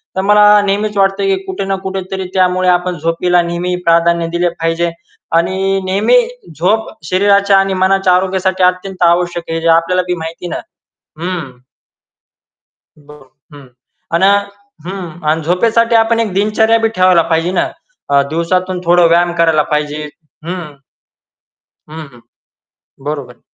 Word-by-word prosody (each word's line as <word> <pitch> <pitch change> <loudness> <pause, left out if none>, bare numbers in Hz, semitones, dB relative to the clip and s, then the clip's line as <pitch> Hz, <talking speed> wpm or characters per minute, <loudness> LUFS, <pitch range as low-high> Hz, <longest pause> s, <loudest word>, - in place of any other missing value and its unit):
तर 190 - 0
मला 210 +1 +4 0.2
नेहमीच 205 +1 -1
वाटतं, 195 0 +1
की 195 0 +2
कुठे 190 +1 -4
ना 195 0 -1
कुठे 190 0 -3
तरी 190 -1 -3
त्यामुळे 185 -1 +2
आपण 180 0 0
झोपीला 170 +3 +1
नेहमी 175 +1 -2
प्राधान्य 170 0 +2
दिले 175 0 +1
पाहिजे. 165 0 -2 0.5
आणि 190 +3 0
नेहमी 200 - +2 0.4
झोप 215 +6 +1 0.2
शरीराच्या 200 +3 +3
आणि 195 0 +1
मनाच्या 190 -1 +3
आरोग्यासाठी 190 0 0
अत्यंत 185 0 0
आवश्यक 175 0 0
आहे, 165 0 -2
जे 165 - -1
आपल्याला 170 +3 +2
बी 180 - 0
माहिती 165 +2 -7
ना. - - -4 0.6
हं. 165 -9 -5 1.4
ब 145 0 -17 0.4
हं. 140 -3 -13 0.5
अन् 170 +3 +2
अ 200 - +5 0.5
हं. 180 -3 -7
आणि 160 +1 +1
झोपेसाठी 230 +7 +1
आपण 225 0 +3
एक 215 -5 -1
दिनचर्या 215 +3 +2
बी 225 - +2
ठेवायला 185 -2 +4
पाहिजे 165 +2 0
ना. - - 0 0.4
अ, 140 0 +4
दिवसातून 180 +3 -1
थोडा 175 0 +4
व्यायाम 175 +1 +3
करायला 165 -3 +2
पाहिजे. 150 0 -2 0.4
हं. 170 -4 -6 1.2
हं, 155 -1 -8
हं. 120 - -17 0.9
बरोबर. 140 -5 -6
180 Hz, 145 wpm, -14 LUFS, 170-195 Hz, 1.4 s, अ